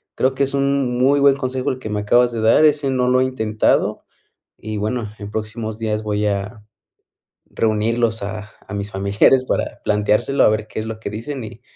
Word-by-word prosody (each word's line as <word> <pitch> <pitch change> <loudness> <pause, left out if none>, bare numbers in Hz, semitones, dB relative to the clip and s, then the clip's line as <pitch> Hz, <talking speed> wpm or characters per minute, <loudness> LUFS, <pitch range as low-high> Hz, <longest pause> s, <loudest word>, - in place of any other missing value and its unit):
Creo 130 +1 +1
que 140 - +1
es 140 - -2
un 140 -3 0
muy 140 +3 +3
buen 140 -1 +5
consejo 130 -1 -2
el 130 - -3
que 110 - -6
me 105 0 -2
acabas 120 +4 +3
de 115 - -4
dar. 115 +7 +5
Ese 145 -2 +2
no 125 -1 +1
lo 130 0 +3
he 130 - +3
intentado 110 -5 0 0.5
y 110 0 -5
bueno, 110 +1 -2
en 100 - -7
próximos 110 0 -5
días 110 -1 -1
voy 105 0 -1
a 105 +2 -3 0.9
reunirlos 115 +1 0
a 105 +1 -6 0.2
a 105 - -7
mis 100 0 -4
familiares 100 +7 +3
para - - -2
planteárselo 105 +6 +2
a - - +6
ver 110 0 -1
qué - - -5
es 110 - -4
lo 110 0 -6
que - - -4
dicen 120 +5 -5
y 110 - -11
110 Hz, 205 wpm, -20 LUFS, 105-130 Hz, 0.9 s, a